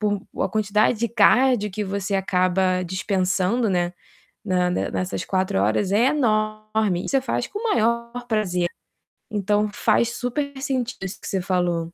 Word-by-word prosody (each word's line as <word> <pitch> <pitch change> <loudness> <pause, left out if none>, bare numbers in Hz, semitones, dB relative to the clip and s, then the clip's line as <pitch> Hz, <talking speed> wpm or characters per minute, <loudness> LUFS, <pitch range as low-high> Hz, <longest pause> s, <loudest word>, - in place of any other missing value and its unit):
por 205 -2 0 0.2
a - - +1
quantidade 215 +1 +1
de 235 - +1
cardio 235 0 +4
que 210 +2 -3
você 200 +1 -3
acaba 185 -1 +1
dispensando, 190 +4 0
né, 175 -1 0 0.5
na 180 -3 +1
ne - - -1
nessas 185 0 -3
4 185 - 0
horas 110 - +1
é 230 +5 +4
enorme 215 -7 0
e - - -6
você 270 -1 +3
faz 240 -1 -1
com 410 - -6
o - - -7
maior 235 +1 +1 0.2
prazer. 180 -6 0 0.6
Então 210 +1 +1
faz 235 - +2
super 280 +3 -2
sentido 260 -3 -2
isso 190 +2 -7
que - - -8
você 195 -3 -1
falou. 175 -2 -1
205 Hz, 160 wpm, -23 LUFS, 185-230 Hz, 0.6 s, cardio